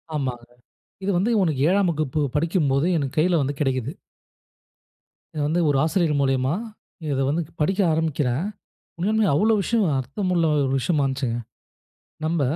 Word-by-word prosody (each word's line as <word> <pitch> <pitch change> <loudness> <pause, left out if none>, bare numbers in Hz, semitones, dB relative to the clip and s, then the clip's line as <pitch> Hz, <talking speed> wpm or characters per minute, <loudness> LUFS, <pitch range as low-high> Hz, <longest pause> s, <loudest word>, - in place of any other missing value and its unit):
ஆமாங்க. 125 -4 -3 0.6
இது 195 - -1
வந்து 200 +7 +1
உனக்கு 155 -7 0
7ஆம் 190 -1 +3
வகுப்பு 155 -2 -1 0.2
படிக்கும்போது, 150 -3 +1
எனக்கு 140 -2 -3
கையில 170 0 +3
வந்து 140 +1 -3
கிடைக்குது. 130 -1 -1 1.4
இது 150 - -3
வந்து 170 +3 +1
ஒரு 140 - +2
ஆசிரியர் 160 -2 +1
மூலியமா, 135 +1 +1 0.6
இத 135 - 0
வந்து 160 +4 0 0.2
படிக்க 190 +6 +1
ஆரம்பிக்கிறேன். 150 -2 0 0.5
உண்மையாளுமே 215 +4 +2
அவ்ளோ 215 +8 +3
விஷயம் 225 +1 +1
அர்த்தமுள்ள 170 +6 -1 0.2
ஒரு 130 - -1
விஷயமா 145 +1 +1
இருந்துச்சிங்க. 130 -3 -2 0.9
நம்ப 160 0 0
155 Hz, 135 wpm, -23 LUFS, 135-175 Hz, 1.4 s, 7ஆம்